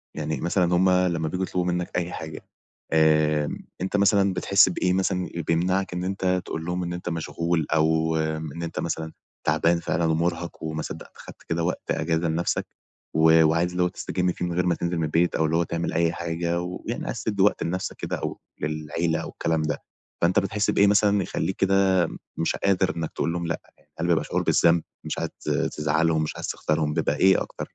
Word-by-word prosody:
يعني 75 0 -3
مثلًا 90 0 +2
هُم 95 +1 +4
لما 90 -3 +2
بييجوا 90 +4 -1
يطلبوا 90 -1 -1
منك 90 0 -1
أي 90 0 -1
حاجة، 80 -1 -6 0.5
آآ، 75 -1 +3 0.3
أنت 95 +2 0
مثلًا 100 -1 +4
بتحس 95 +1 +4
بإيه 90 +1 0
مثلًا 95 -1 0
ال 85 - -2
بيمنعك 90 +3 0
إن 90 0 -3
أنت 95 -1 0
تقول 80 0 -5
لهم 90 +1 -2
إن 85 0 -3
أنت 90 0 -4
مشغول 85 -1 -1
أو 80 0 +2
إن 80 +1 -3
أنت 80 - -4
مثلًا 80 -1 -3 0.3
تعبان 85 +3 +3
فعلًا 85 0 0
ومرهق 85 +1 -1
وما 80 0 -3
صدقت - - -8
خدت - - -12
كده 85 0 -2
وقت 90 - -2
أجازة 80 +1 0
لنفسك 80 +2 0 0.5
و 80 0 +6
وعايز 85 +3 +2
اللي 90 0 +1
هو - - +3
تستجم 90 0 -1
فيه 90 - -4
من 85 - -2
غير 90 +1 +1
ما 85 -2 +2
تنزل 85 0 -2
من 80 - 0
البيت، 85 +3 +1
أو 80 - +2
اللي 80 +1 0
هو 85 - +3
تعمل 85 +1 -3
أي 85 0 +2
حاجة، 85 +1 -2
ويعني 90 +1 -5
عايز - - -4
تدي 100 -3 -1
وقت 105 - +3
لنفسك 90 +3 -3
كده - - -3
أو - - -4 0.2
للعيلة 75 +2 -1
أو - - -6
الكلام 80 -1 -1
ده، 75 - -2 0.4
فأنت 85 +2 +4
بتحس 100 +2 -1
بإيه 100 - +4
مثلًا 100 -1 +4
يخليك 95 - -2
كده 95 0 +3 0.4
مش 80 - 0
قادر 95 -2 +1
إنك 80 -1 -3
تقول 85 - -1
لهم 85 -1 -2
لأ؟ 85 - -2 0.2
يعني - - -30
هل 85 - 0
بيبقى 85 -2 +2
شعور - - -1
بالذنب، 85 -1 +4 0.2
مش - - -4
عايز - - -2
تز - - +1
تزعلهم، 80 +1 +2
مش 75 - -3
عايز - - -5
تخسرهم، 75 -1 -1
بيبقى - - 0
إيه 95 -1 +5
أكتر - - -8
85 Hz, 205 wpm, -25 LUFS, 80-90 Hz, 0.5 s, و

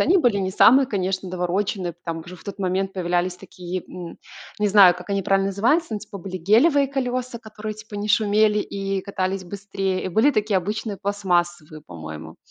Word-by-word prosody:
Они 350 +6 +4
были 245 - +3
не 190 -1 -1
самые, 260 +8 +6
конечно, 190 -4 -2
навороченные. 185 +1 -2
Там 165 0 -3
уже 180 +1 -10
в - - -18
тот 200 -1 -7
момент 190 0 -1
появлялись 180 0 -1
такие, 180 -1 -7
м, 175 -2 -9 0.4
не 210 - +2
знаю, 195 -3 +7
как 180 +3 -10
они 200 0 +1
правильно 195 +1 +2
называются, 235 - +1
ну, 215 - -1
типа 205 -1 -10
были 185 0 -6
гелевые 270 - +4
колеса, 255 -2 -3
которые, 215 -1 -7
типа, 215 0 -12
не 205 +1 -3
шумели 210 0 +3
и 195 -1 -3
катались 190 -1 -3
быстрее, 195 0 -3
и - - -1
были 220 +10 +4
такие 215 -5 +1
обычные 210 +3 -2
пластмассовые, 175 -6 -1
по-моему. 80 -1 -9
195 Hz, 180 wpm, -23 LUFS, 180-215 Hz, 0.4 s, знаю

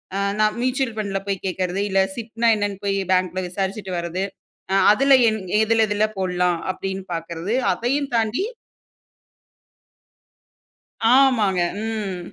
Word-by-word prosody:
அ - - -1 0.2
நான் 215 0 +2
மியூச்சுவல் 255 -1 0
ஃபண்ட்ல 200 -2 -2
போய் 195 -1 0
கேட்கிறது. 185 0 -2
இல்லை, 195 0 +3
சிப் 230 -1 -8
ன்னா 235 - +3
என்னன்னு 205 -2 -2
போய் 195 0 +1
bank 185 0 +3
ல - - +1
விசாரிச்சுட்டு 195 +1 -4
வருகிறது, 170 +2 -3 0.5
"அ-அதுல 270 +8 +5
என் 220 0 -2 0.2
எதுல 225 0 +3
எதுல 205 +1 +1
போடலாம்?" 180 -2 0
அப்படீன்னு 190 0 -5
பார்க்கிறது. 165 +4 -4 0.2
அதையும் 275 +4 -1
தாண்டி 225 - +1 2.7
ஆமாங்க. 225 -9 +3 0.2
ம். 210 -5 -3
200 Hz, 125 wpm, -22 LUFS, 185-225 Hz, 2.7 s, அ-அதுல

